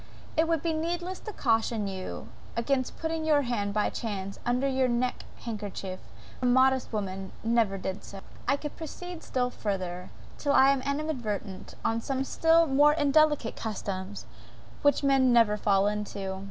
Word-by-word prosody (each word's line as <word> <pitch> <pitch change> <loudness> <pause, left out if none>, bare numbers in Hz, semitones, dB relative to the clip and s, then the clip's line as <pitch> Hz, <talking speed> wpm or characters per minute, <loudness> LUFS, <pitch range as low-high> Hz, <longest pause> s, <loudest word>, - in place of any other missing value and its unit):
"It 320 +1 +3
would 330 -2 0
be 330 -1 +1
needless 345 +3 -2
to 430 - -7
caution 225 - +1
you 185 - -6 0.3
against 255 +2 0
putting 320 0 -2
your 300 -2 +3
hand, 220 -5 -1
by 210 0 +1
chance, 200 -4 -4
under 250 +3 +2
your 265 -1 +2
neck 245 +1 -1 0.2
handkerchief; 205 -4 -5 0.4
for 250 - +1
a - - +4
modest 260 +1 +4
woman 195 -3 -4
never 225 -3 +2
did 190 0 -4
so!") 195 - -9 0.3
I 280 - +3
could 295 0 -6
proceed 340 +2 -7
still 250 -1 -1
further, 185 -5 -3 0.3
till 285 -1 +1
I 270 0 +7
animadverted 260 -9 -3
on 225 0 +1
some 265 +2 -1
still 330 +4 +4
more 290 +1 +5
indelicate 295 -4 +3
customs, 200 -2 -5 0.6
which 285 -1 +3
men 270 -2 +4
never 230 -3 +5
fall 200 -2 +2
into. 205 -2 -3
245 Hz, 155 wpm, -28 LUFS, 205-285 Hz, 0.6 s, I